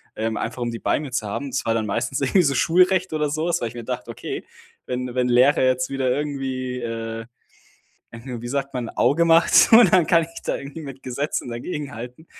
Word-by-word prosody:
ähm, 110 0 -2
einfach 125 - -4
um 120 - -1
die 115 - -5
bei - - 0
mir 150 -3 -6
zu 115 -4 -2
haben. 135 +7 -4
Das 135 - -3
war 115 - +1
dann 110 -2 -1
meistens 120 +6 -2
irgendwie 175 +7 +3
so 140 -2 +2
Schulrecht 185 +4 +3
oder 150 -2 0
sowas, 160 +1 -1
weil 115 - -1
ich - - -13
mir 120 - -7
gedacht: 125 +1 -5
„Okay, 115 - -6 0.4
wenn 125 0 -4
wenn 125 -1 +1
Lehrer 125 +3 +4
jetzt 130 0 +1
wieder 135 -2 -1
irgendwie, 130 -3 -3
äh 115 -1 -5 0.9
wie 120 -1 -7
sagt 140 +1 -2
man 125 -3 -3
Auge 170 +4 +2
macht 165 +1 +6
und 225 -5 +8
dann 180 -4 +5
kann 170 -1 +4
ich 165 +1 -8
da - - -1
irgendwie 140 +4 -8
mit 135 -3 -9
Gesetzen 130 0 -3
dagegenhalten“. 125 +1 -6
130 Hz, 210 wpm, -22 LUFS, 120-150 Hz, 0.9 s, und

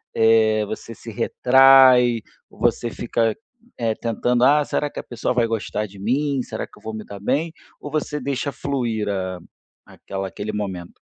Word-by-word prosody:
eh, 110 -1 +4
você 110 +2 -7
se 115 - -10
retrai, 125 0 +5 0.3
você 120 - -1
fica, 115 -1 -1 0.4
eh, 115 -2 0
tentando: 120 +1 0
"Ah, 145 +2 +5
será 145 - -1
que - - -7
a - - -6
pessoa 120 +1 -3
vai 120 -1 +3
gostar 110 -1 -2
de 100 -1 -13
mim? 135 +5 0
Será - - -5
que - - -20
eu - - -24
vou 110 - -5
me 110 -1 -7
dar 100 - -9
bem?" 145 +10 -1 0.3
Ou 145 - -8
você 150 -1 -2
deixa 140 +1 -2
fluir 120 -8 -2 0.8
aquela 95 0 -6
aquele 105 +3 -5
momento? 95 -4 -5
115 Hz, 170 wpm, -22 LUFS, 110-135 Hz, 0.8 s, retrai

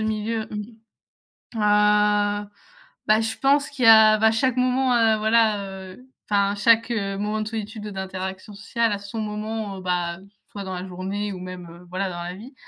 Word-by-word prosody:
milieu, 220 +1 -2
mmh. 210 +2 -7 0.8
Ah 210 0 +2 0.6
bah 215 +1 +4
je 225 0 -2
pense 280 +2 +2
qu'il 260 -4 -2
y - - +7
a 220 -1 +8
bah 220 +1 +4
chaque 255 +3 0
moment, 255 0 +2
heu, 225 -2 +3
voilà, 215 -1 +2 0.3
heu 250 +7 -17 0.2
enfin 200 -1 +2
chaque 225 +2 +3
moment 210 0 -2
de 215 - -4
solitude 220 -1 -6
ou - - -6
d'interaction 190 +1 -6
sociale 225 +2 -1
a 200 - -3
son 200 +2 -7
moment, 210 -1 -4
bah, 175 -1 -2 0.3
soit 200 -1 -6
dans 190 -1 -6
la 180 +1 -6
journée 195 +3 -4
ou 185 - -8
même, 180 -1 -8
heu, 170 +1 -14
voilà 185 +1 -2
dans 175 -1 -6
la 175 +1 -5
vie 235 +8 -12
210 Hz, 180 wpm, -23 LUFS, 195-225 Hz, 0.8 s, a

